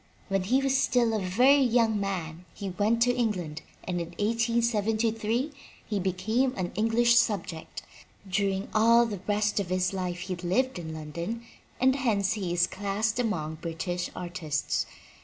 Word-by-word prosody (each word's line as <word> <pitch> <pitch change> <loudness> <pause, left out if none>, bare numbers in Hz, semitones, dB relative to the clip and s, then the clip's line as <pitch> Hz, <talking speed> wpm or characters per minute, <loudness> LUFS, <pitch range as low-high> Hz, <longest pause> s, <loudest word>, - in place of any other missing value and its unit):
When 195 -1 +1
he 260 +7 +2
was 270 0 +2
still 245 -4 +2
a 215 - +1
very 250 +10 +4
young 230 -4 +3
man 180 -4 -4
he 195 -2 -5
went 215 +5 +2
to 245 0 +3
England 180 -10 -2 0.2
and 175 -1 -2
in 170 - -4
1873 225 +2 +1 0.4
he 210 -2 -1
became 220 +8 0
a 185 - -1
British 225 +5 +3
subject. 185 -8 -1 0.4
During 195 +1 0
all 230 +2 +5
the 205 -5 -5
rest 210 0 +1
of 195 -3 -3
his 185 0 0
life 180 -2 -3
he 185 0 -3
lived 185 +7 0
in 160 -2 -6
London 170 +9 -5 0.4
and 260 +1 +4
hence 215 -6 +1
he 195 -5 -3
is 175 0 +3
classed 210 +3 -2
among 160 -10 -2
British 175 +1 -3
ar 180 -1 -5
tists. 155 -5 -2
205 Hz, 160 wpm, -28 LUFS, 180-230 Hz, 0.4 s, all